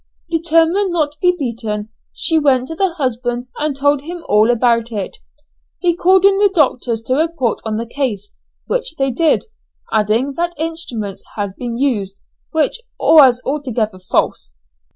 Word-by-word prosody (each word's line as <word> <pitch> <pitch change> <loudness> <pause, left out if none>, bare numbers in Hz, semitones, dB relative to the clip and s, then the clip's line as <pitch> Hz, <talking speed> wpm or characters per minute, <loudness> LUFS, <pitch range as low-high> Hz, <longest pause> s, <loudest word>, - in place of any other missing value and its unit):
Determined 330 +4 +2
not 310 -4 +1
to 300 - -21
be 360 0 +3
beaten, 225 -6 -4 0.2
she 325 -1 +1
went 260 -4 +2
to 325 - -5
the 370 -1 0
husband 245 -3 -2
and 300 -2 -1
told 285 0 +2
him 340 +3 -8
all 210 +2 +4
about 235 -1 +2
it. 205 -4 -4 0.6
He 345 -2 +1
called 375 +2 +4
in 395 0 +5 0.2
doctors 250 -7 +1
to 255 - -1
report 300 -5 0
on 215 -1 -2
the 230 - -3
case, 230 -6 -3 0.3
which - - -2
they 270 -3 0
did, 315 +6 +2 0.5
adding 220 +6 +1
that 345 0 -1
instruments 285 - -4
had 200 -2 -3
been 240 -2 -5
used, 205 -8 -1 0.3
which 320 +9 0 0.2
was 265 -6 +6
altogether 245 -8 -2
false. 180 - -1
265 Hz, 155 wpm, -17 LUFS, 230-325 Hz, 0.6 s, was